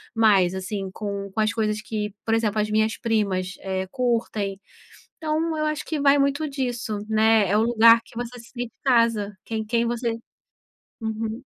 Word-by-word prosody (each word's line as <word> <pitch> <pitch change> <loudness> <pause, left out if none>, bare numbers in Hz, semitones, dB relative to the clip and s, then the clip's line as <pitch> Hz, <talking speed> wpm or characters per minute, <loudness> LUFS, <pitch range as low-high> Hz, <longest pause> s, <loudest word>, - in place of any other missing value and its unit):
mais, 200 -5 +4
assim, 190 0 -4
com 200 -1 -5
com 220 - -4
as 215 -1 +2
coisas 215 -1 -1
que 210 -1 -4
por 225 - +1
exemplo, 220 -2 +1
as 210 - -2
minhas 220 +1 +1
primas, 200 -5 0
eh, 190 -1 -3
curtem. 225 -6 -1 0.6
Então 315 0 -1
eu 305 - 0
acho 305 -1 -2
que 310 -2 -3
vai 280 0 +5
muito 280 +2 +1
disso, 245 -6 -3
né, 220 -2 +4
é 205 - +2
o 220 - +4
lugar 230 0 +6
que - - -18
você 245 +1 -5
se 230 - -14
sente 245 -1 -4
em 230 - -15
casa, 230 -5 +3
quem 220 -1 -3
quem 230 +2 +1
você 235 -1 -2 0.8
uhum. 220 +2 -3
225 Hz, 180 wpm, -24 LUFS, 210-240 Hz, 0.8 s, lugar